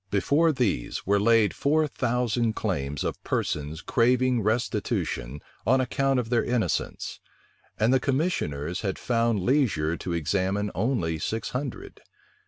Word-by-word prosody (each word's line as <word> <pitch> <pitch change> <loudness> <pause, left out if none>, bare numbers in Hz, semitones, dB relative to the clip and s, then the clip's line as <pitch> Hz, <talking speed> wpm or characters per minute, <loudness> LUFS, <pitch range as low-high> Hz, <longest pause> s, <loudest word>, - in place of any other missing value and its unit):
Before 145 - +3
these 120 - -1
were 100 +1 +3
laid 115 0 +4
four 155 +2 +2
thousand 120 -3 0
claims 75 -9 -2
of - - -4
persons 75 +2 -2
craving 125 0 +2
restitution 100 - -1 0.2
on 130 +5 +3
account 135 +1 +1
of 120 -1 -4
their 120 - +3
innocence; 115 -8 -2 0.6
and 110 +4 +3
the 130 - +4
commissioners 110 - -1
had 95 -3 -2
found 115 -3 +1
leisure 100 - +1
to 90 - -4
examine 95 +5 0
only 95 - 0
six 110 +7 -3
hundred. 130 0 -5
115 Hz, 130 wpm, -26 LUFS, 95-125 Hz, 0.6 s, laid